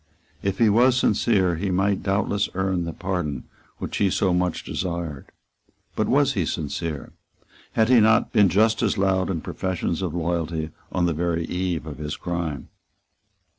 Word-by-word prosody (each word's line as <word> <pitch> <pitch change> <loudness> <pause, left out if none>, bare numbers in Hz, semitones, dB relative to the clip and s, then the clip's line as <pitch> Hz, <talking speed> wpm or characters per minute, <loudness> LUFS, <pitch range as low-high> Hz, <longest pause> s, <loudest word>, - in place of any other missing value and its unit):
If 100 -1 -1
he 115 - +4
was 120 +4 +4
sincere, 100 -7 +2
he 100 +4 -2
might 95 +1 +1
doubtless 100 +1 0
earn 95 -2 0
the 85 - -3
pardon 85 -7 -3 0.3
which - - -4
he 100 - +3
so 95 0 +1
much 90 -1 0
desired. 85 -6 -4 0.7
But - - 0
was - - +3
he - - 0
sincere? 80 0 -4 0.6
Had 110 -1 +3
he 125 -2 +7
not 110 +1 +3
been 100 -2 +5
just 110 +4 +3
as 110 -2 +1
loud 95 -1 +1
in 85 -4 -2
professions 90 -1 -2
of 90 -3 -3
loyalty 85 -2 -2 0.2
on 90 - +1
the 85 - +1
very 85 +1 -1
eve 90 -4 -2
of 75 -2 -8
his 75 0 -4
crime? 85 -6 -4
90 Hz, 165 wpm, -24 LUFS, 85-100 Hz, 0.7 s, he